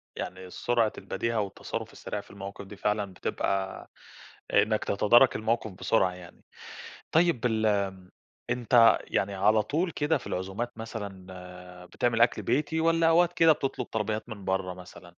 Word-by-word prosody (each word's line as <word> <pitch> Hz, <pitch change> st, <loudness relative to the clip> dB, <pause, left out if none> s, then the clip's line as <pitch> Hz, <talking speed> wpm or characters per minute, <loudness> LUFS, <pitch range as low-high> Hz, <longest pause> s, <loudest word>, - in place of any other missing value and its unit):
يعني 95 Hz, 0 st, -6 dB
سرعة 115 Hz, +2 st, +1 dB
البديهة 115 Hz, -1 st, -2 dB
والتصرُّف 100 Hz, -2 st, -5 dB
السريع -, -, -5 dB
في -, -, -18 dB
المواقِف 100 Hz, 0 st, -8 dB
دي 100 Hz, -, -11 dB
فعلًا 105 Hz, -1 st, -1 dB
بتبقى 95 Hz, +1 st, -3 dB, 0.6 s
إنّك 110 Hz, 0 st, +3 dB
تتدارَك 120 Hz, +6 st, +4 dB
الموقِف 110 Hz, 0 st, -1 dB
بسرعة 95 Hz, 0 st, +1 dB
يعني. 90 Hz, -1 st, -13 dB, 0.7 s
طيب 160 Hz, -7 st, +3 dB
الم 100 Hz, -5 st, 0 dB, 0.4 s
أنت 120 Hz, -1 st, +5 dB
يعني 100 Hz, 0 st, -1 dB
على 105 Hz, +3 st, +3 dB
طول 165 Hz, -, -1 dB
كده 150 Hz, 0 st, 0 dB
في -, -, -14 dB
العزومات 100 Hz, +6 st, -4 dB
مثلًا 90 Hz, -4 st, -9 dB
بتعمل 115 Hz, +4 st, -1 dB
أكل 120 Hz, -, +3 dB
بيتي 150 Hz, +6 st, 0 dB
والّا 165 Hz, 0 st, +3 dB
أوقات 170 Hz, +1 st, +4 dB
كده 165 Hz, -2 st, +5 dB
بتطلُب 135 Hz, -4 st, -3 dB
طلبيّات 110 Hz, +1 st, -3 dB
من 105 Hz, -4 st, -8 dB
برّه 95 Hz, -1 st, -1 dB
مثلًا؟ 90 Hz, -1 st, -13 dB
110 Hz, 140 wpm, -28 LUFS, 95-120 Hz, 0.7 s, أنت